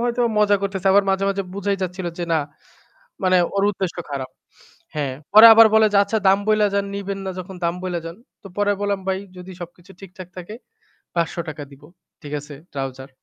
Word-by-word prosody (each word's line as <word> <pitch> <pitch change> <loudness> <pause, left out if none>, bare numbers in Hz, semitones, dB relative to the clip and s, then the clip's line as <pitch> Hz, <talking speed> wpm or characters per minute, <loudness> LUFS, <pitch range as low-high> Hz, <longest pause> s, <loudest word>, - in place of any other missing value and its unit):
হয়তো 240 0 0 0.2
মজা 205 -1 +4
করতেছে 195 -1 -3
আবার 200 0 +5
মাঝে, 195 +1 0
মাঝে 195 0 -1
বুঝাই 200 0 -1
যাচ্ছিল 180 0 -4
যে 175 - -2
না 160 - +3 0.8
মানে 185 0 +3 0.2
ওর 200 - +1
উদ্দেশ্য 190 -3 -4
খারাপ। 135 -2 -4 0.6
হ্যাঁ, 145 -3 -2 0.2
পরে 215 +2 +10
আবার 225 0 +8
বলে 220 0 +6
যে, - - +3
"আচ্ছা 210 +2 -1
দাম 195 +1 +5
বইলা 215 -1 +3
যান, 200 0 +1
নিবেন 200 0 -4
না 190 - -2
যখন 185 +1 -8
দাম 170 +1 +1
বইলা 180 -2 -3
যান।" 165 +2 -7 0.3
তো - - -11
পরে 205 0 +1
বললাম 200 -1 -1
"ভাই 190 0 0 0.2
যদি 180 +1 -10
সবকিছু 175 +2 -11
ঠিকঠাক 185 -2 -11
থাকে 180 +4 -8 0.6
৳৫০০ 165 -2 -3
দিব।" 140 0 -17 0.4
ঠিক 145 - -9
আছে 145 +1 -11 0.2
trouser। 135 -1 -5
190 Hz, 190 wpm, -21 LUFS, 170-200 Hz, 0.8 s, পরে